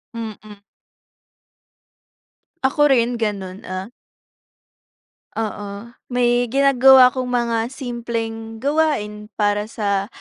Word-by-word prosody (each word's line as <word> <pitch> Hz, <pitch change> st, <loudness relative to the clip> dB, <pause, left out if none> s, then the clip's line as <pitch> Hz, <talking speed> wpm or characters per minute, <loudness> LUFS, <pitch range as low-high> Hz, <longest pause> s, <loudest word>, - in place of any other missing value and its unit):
Mm. 215 Hz, -2 st, -8 dB, 2.1 s
Ako 295 Hz, +3 st, +3 dB
rin 245 Hz, -3 st, +2 dB
gano'n, 195 Hz, -4 st, -3 dB
ah 185 Hz, +1 st, -5 dB, 1.5 s
Oo. 205 Hz, 0 st, -5 dB, 0.2 s
May 245 Hz, 0 st, +2 dB
ginagawa 265 Hz, -2 st, +7 dB
akong 255 Hz, 0 st, -4 dB
mga 235 Hz, -1 st, -1 dB
simpleng 230 Hz, -3 st, -5 dB
gawain 275 Hz, -8 st, 0 dB
para 205 Hz, 0 st, 0 dB
sa 200 Hz, -3 st, -2 dB
230 Hz, 80 wpm, -20 LUFS, 210-250 Hz, 2.1 s, ginagawa